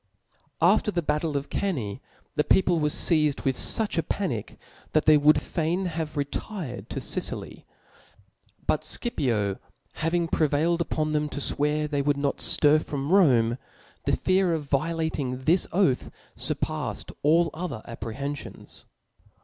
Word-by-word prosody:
After 215 - +4
the 175 -4 -1
battle 150 0 0
of 140 +1 -6
Cannae, 135 - -2 0.3
the 150 - +2
people 180 -1 +3
were 150 -1 +1
fdzed 150 -2 +2
with 135 -1 +2
fuch 215 - +1
a - - +3
panic, 145 - -3 0.4
that 155 - +2
they 155 - +7
would 150 +1 +5
fain 170 +3 -1
have 160 -3 -4
retired 145 - -4
to - - -3
Sicily, - - -3 1.0
ButScipio 115 - 0 0.3
having 165 +1 0
prevail 155 +1 +2
ed 170 - -1
upon 155 -2 -1
them 150 0 0
to 145 - -5
fwear 150 +2 0
they 145 -1 -1
would 145 0 +1
not 140 0 -1
ftir 150 +1 +3
from 140 +1 -4
Rom6', 125 - +4 0.5
the - - +2
fear 185 -2 +2
of 155 - -3
violating 145 -3 -1
this 170 +7 +2
oath 175 -9 +2 0.3
furpaffed - - -3
all 165 +2 +3
other 165 -9 -5
apprehenfions. 120 +5 -7
150 Hz, 140 wpm, -26 LUFS, 140-170 Hz, 1.0 s, they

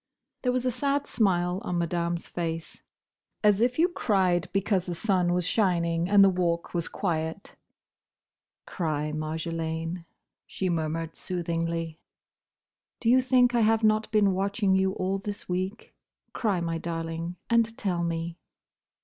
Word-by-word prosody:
There 250 - +1
was 255 0 -1
a 255 - +2
sad 280 +3 0
smile 180 -4 +1
on 180 - -2
Madame's 170 0 -1
face. 165 -2 -4 0.6
As 210 0 +4
if 245 +1 +2
you 335 +2 +5
cried 190 - +1
because 195 -1 0
the 175 - -3
sun 180 -2 +1
was 180 -1 +1
shining 170 -4 +1
and 200 -1 +7
the 195 - +7
Walk 175 -2 -1
was 170 -2 -1
quiet! 165 0 -3 1.1
"Cry, 150 -3 -2
Marjolaine," 160 +2 -3 0.4
she 190 - -2
murmured 165 -1 -2
soothingly. 165 -2 -3 1.0
"Do 230 - +2
you 255 +1 +6
think 250 -1 +4
I 240 - +3
have 225 +1 +3
not 215 0 +3
been 205 -3 +4
watching 200 +1 +1
you 190 0 +2
all 190 +1 -1
this 205 +1 -6
week? 185 +4 -3 0.4
Cry, 200 -7 0
my 165 -1 -2
darling, 165 +1 -4
and 230 -1 +2
tell 180 -4 -1
me." 165 0 -3
180 Hz, 140 wpm, -27 LUFS, 165-210 Hz, 1.1 s, and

